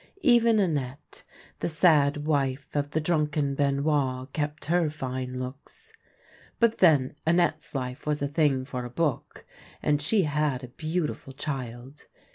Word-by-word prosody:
Even 235 -4 +5
Annette, 145 -9 -2 0.4
the - - -1
sad 150 -3 +3
wife 140 -2 0
of 145 -1 0
the 155 - 0
drvmken 150 -3 0
Benoit, 140 -2 0
kept 150 0 -3
her 170 0 +2
line 130 -1 -4
looks; 140 - -8 0.7
but 230 -1 +3
then, 145 -8 +4
Annette's 165 -3 +1
life 130 +2 -4
was 150 -1 0
a 140 - -1
thing 140 -3 +1
for 125 -2 -5
a 120 - -6
book, 145 0 -2 0.3
and 145 -1 +1
she 185 +7 +2
had 150 -3 0
a 125 - -8
beautiful 155 -1 -3
child. 130 -1 -6
145 Hz, 140 wpm, -27 LUFS, 130-160 Hz, 0.7 s, Even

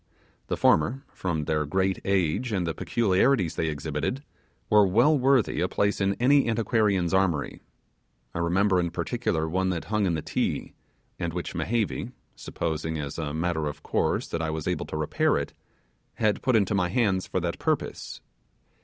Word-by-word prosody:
The - - -2
former, 120 - +3
from 85 -5 -2
their 75 -1 0
great 95 +5 0
age 95 +5 0
and 95 -4 0
the 80 - -1
peculiarities 100 - +2
they 80 - -1
exhibited, 80 - -3 0.4
were 105 -2 +5
well 120 +11 +4
worthy 135 -3 +2
a 90 - +2
place 100 +2 0
in 100 0 +2
any 135 +1 +3
antiquarian's 105 -5 +1
armoury. 90 -6 0 0.7
I - - -3
remember 90 +3 +2
in 85 -1 0
particular 85 -2 -1
one 95 +3 0
that 85 -3 -2
hung 105 -2 +2
in 85 - +1
the 80 - -3
Ti, - - -2 0.5
and 85 -1 -2
which 90 0 -4
Mehevi 115 -2 -2 0.2
supposing 80 0 -3
as 75 +1 -5
a 75 -3 -3
matter 80 0 -1
of 75 - -7
course - - 0
that 85 - -2
I 80 - -1
was 80 -1 -4
able - - -1
to 80 - -4
repair 75 -1 +1
it - - -4 0.6
had 105 -2 +1
put 130 -4 +2
into 105 -2 +2
my 90 -3 +1
hands 95 -3 +1
for - - -1
that 85 -1 -3
purpose. - - -2
95 Hz, 170 wpm, -26 LUFS, 80-105 Hz, 0.7 s, were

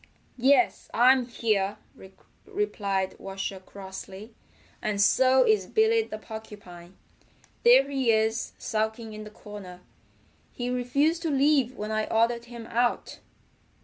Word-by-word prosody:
"Yes, 260 0 +3
I'm 250 +1 +5
here," 210 -4 0 0.7
replied 200 - -2
Washer 195 0 -5
crossly. 195 +3 -10 0.5
"And 210 -1 -2
so 255 +5 +4
is 205 -4 +2
Billy 445 +1 +3
the 435 - -6
Porcupine. 205 -5 -11 0.6
There 255 +3 +6
he 265 -4 +1
is 220 +1 0
sulking 220 0 -3
in 215 0 -8
the - - -9
corner. 205 -4 -11 0.7
He 245 0 -3
refused 280 +7 +1
to 330 - -1
leave 275 -3 +2
when 210 +1 -4
I 215 0 -1
ordered 235 +1 +1
him 235 -1 -10
out." 240 +2 -1
225 Hz, 120 wpm, -27 LUFS, 205-255 Hz, 0.7 s, There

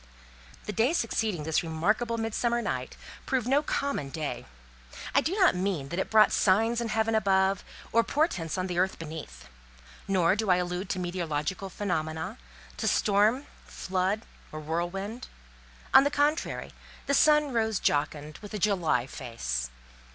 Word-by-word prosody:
The 210 - -4
day 235 - +2
succeeding 220 - -1
this 160 0 +1
remarkable 210 +9 0
Midsummer 230 +2 0
night, - - -3 0.3
proved 260 -4 0
no 275 +3 +4
common 280 - -2
day. 150 - -4 0.7
I 280 - +5
do 335 +6 -1
not 380 -4 +5
mean 180 -7 -2
that 175 - -3
it - - -2
brought 215 -1 +6
signs 225 +5 +3
in 235 - -2
heaven 220 0 0
above, 195 -2 +2 0.3
or 230 +1 +4
portents 210 - 0
on 185 - -1
the 180 -2 -2
earth 190 +1 +1
beneath; 150 - -8 0.6
nor 185 -2 +3
do 215 -1 -2
I 180 - +6
allude 180 +1 -2
to - - -1
meteorological 175 +1 -3
phenomena, 160 - -3 0.4
to - - -1
storm, 215 +7 +3 0.2
flood, 190 +4 -1 0.3
or 155 - -6
whirlwind. 175 +9 -3 0.7
On - - +9
the 285 - +2
contrary: 290 +2 0 0.3
the 280 - 0
sun 300 -1 +4
rose 220 -3 +1
jocund, 150 +1 -1
with 210 0 -8
a - - -1
July 175 - +1
face. 115 - -4
195 Hz, 150 wpm, -28 LUFS, 165-230 Hz, 0.7 s, On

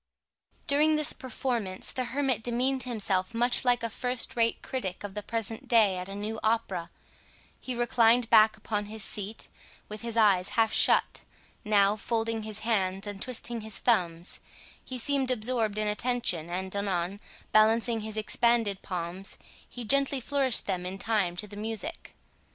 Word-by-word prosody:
During 305 +2 +4
this 305 -1 +2
performance, 240 -7 -3
the 255 - -2
hermit 260 -3 0
demeaned 250 +3 0
himself 210 -3 -1
much 240 +1 +2
like 245 -2 +2
a 230 - -1
first 250 +3 -3
rate 230 -1 +1
critic 195 -9 -4
of 205 -1 -6
the 210 - -3
present 225 +1 -4
day 220 -5 +4
at 180 +1 -7
a 195 - -6
new 215 +2 -4
opera. 200 -6 -1 0.7
He 255 - -5
reclined 240 0 +3
back 220 0 +6
upon 210 0 -3
his 215 0 -5
seat, 210 +2 -3 0.4
with 210 0 -7
his 235 -1 -4
eyes 200 -4 +4
half 225 -1 +3
shut; - - +3 0.4
now, 205 -2 +4
folding 225 +1 -1
his 215 0 -5
hands 195 -3 0
and 205 -1 -6
twisting 240 -2 -2
his 220 -1 -4
thumbs, 175 -7 0 0.4
he 255 - -5
seemed 270 +1 +1
absorbed 225 -3 0
in 215 0 0
attention, 210 -7 -1
and 185 +2 -4
anon, 195 -1 -1 0.3
balancing 225 +1 +4
his 215 0 -4
expanded 220 -2 +2
palms, 180 +1 -4 0.3
he 245 - -6
gently 275 +3 +3
flourished 265 -1 +1
them 185 -3 -1
in 185 +2 -5
time 195 -4 0
to 210 - -2
the 205 0 -11
music. 225 +9 -4
220 Hz, 160 wpm, -28 LUFS, 200-240 Hz, 0.7 s, back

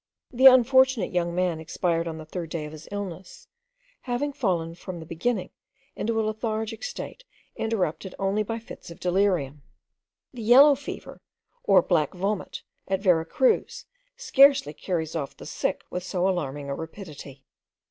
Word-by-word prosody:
The 260 +2 +7
unfortunate 260 -4 +5
young 170 -1 0
man 180 -3 0
expired 165 +1 -1
on 160 -1 -5
the 155 - -9
third 165 +1 -6
day 160 -2 -4
of 150 - -8
his 155 0 -11
illness, 205 - -7 0.5
having 270 +3 -2
fallen 175 - -1
from 175 +1 -8
the 160 - -9
beginning 185 +4 -2 0.4
into 225 +1 -1
a 220 - +1
lethargic 220 0 -3
state - - -6 0.3
interrupted 190 -5 -2
only 195 +2 0
by 225 +2 -3
fits 230 - -11
of 170 - -11
delirium. 180 -7 0 0.7
The 245 - -8
yellow 265 +6 +7
fever, 275 0 -8 0.4
or - - +5
black 165 -1 +1
vomit, 195 +2 -3 0.2
at 190 0 -1
Vera 175 -5 +3
Cruz, 255 +10 +1 0.3
scarcely 275 - +5
carries 160 -2 -3
off 140 -4 -4
the - - -11
sick - - -2
with 180 - -3
so 185 0 0
alarming 145 -6 -2
a 140 - -2
rapidity. 150 -5 -9
185 Hz, 155 wpm, -26 LUFS, 165-230 Hz, 0.7 s, The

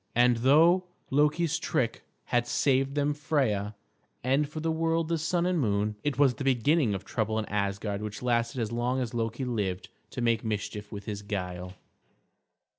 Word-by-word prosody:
And 120 0 +5
though 160 +9 +5 0.3
Loki's 150 +3 +2
trick - - -1 0.2
had 120 0 0
saved 135 +1 +1
them 145 0 +1
Freia, 125 -9 0 0.5
and 135 +3 +2
for 155 - -6
the 160 +1 0
world 165 0 0
the 165 -1 0
Sun 170 +2 0
and 180 -1 +1
Moon, 105 -3 0
it 145 -4 -1
was 140 -3 +5
the 135 - -6
beginning 135 -2 +2
of 95 0 -6
trouble 110 +1 -1
in 110 - -1
Asgard 100 0 -2
which 105 +2 -6
lasted 120 0 0
as 110 -1 -2
long 120 +2 0
as 125 -3 -3
Loki 115 +2 -2
lived 100 -7 -2 0.2
to - - -7
make 115 -1 +2
mischief 105 -1 -4
with 100 -1 -7
his 105 -2 -4
guile. 90 -3 -5
120 Hz, 175 wpm, -28 LUFS, 105-145 Hz, 0.5 s, And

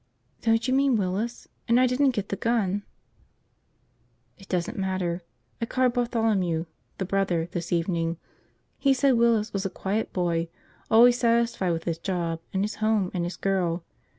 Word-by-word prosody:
"Don't 225 +1 +2
you 255 - +1
mean 270 -1 +3
Willis? 205 +5 -2 0.2
And 235 +1 +4
I 255 - +5
didn't 260 +3 +3
get 200 -1 -3
the - - -1
gun!" 205 -3 0 1.6
"It 195 - -15
doesn't 185 +6 -1
matter. 185 -3 -2 0.4
I 230 - -1
called 255 0 +2
Bartholomew, 220 -9 0 0.3
the 190 - -2
brother, 180 -4 0
this 170 -1 -4
morning. 170 -1 0 0.6
He 275 -1 +3
said 270 +1 +3
Willis 230 -3 +2
was 195 -1 -1
a 195 - -1
quiet 205 +4 -2
boy, 170 -2 0 0.4
always 240 +2 +6
satisfied 230 -6 +2
with 165 0 -3
his 165 -1 -2
job 170 -3 -2
and 190 0 0
his 210 - -3
home 215 -4 +2
and 180 -2 -1
his 175 0 -5
girl. 180 -3 0
195 Hz, 160 wpm, -26 LUFS, 175-235 Hz, 1.6 s, always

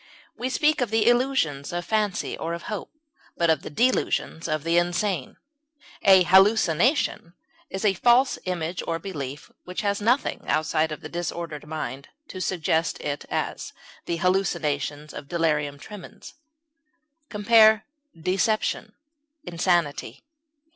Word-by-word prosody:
We 250 - -3
speak 300 +2 +2
of 245 - 0
the 220 0 +2
illusions 240 - +1
of 175 0 -3
fancy 215 -3 -1
or 165 +1 -3
of 170 - -9
hope, 210 -2 -5 0.5
but 170 -1 +3
of 155 - +1
the - - -7
delusions 195 - 0
of 155 -2 -1
the 165 +1 +3
insane. 175 -3 -2 0.6
A 190 -2 +7
hallucination 190 - +3 0.3
is 190 +3 -4
a 200 - +4
false 245 +7 +3
image 180 -1 -3
or 165 - 0
belief 150 -6 -7
which 180 0 -5
has 200 0 -1
nothing, 245 +6 +1
outside 155 0 +1
of 155 - -6
the - - -7
disordered 170 -3 -5
mind, 150 -3 -5 0.2
to 185 - -7
suggest 165 -3 0
it; 145 0 -4
as, - - -3 0.3
the 170 - -2
hallucinations 155 -5 -1
of 145 - -8
delirium 150 -4 0
tremens. 205 +5 -11 1.0
Compare 220 0 +5 0.3
DECEPTION; 210 +4 0 0.5
INSANITY. 170 -3 -1
175 Hz, 130 wpm, -25 LUFS, 160-210 Hz, 1.0 s, A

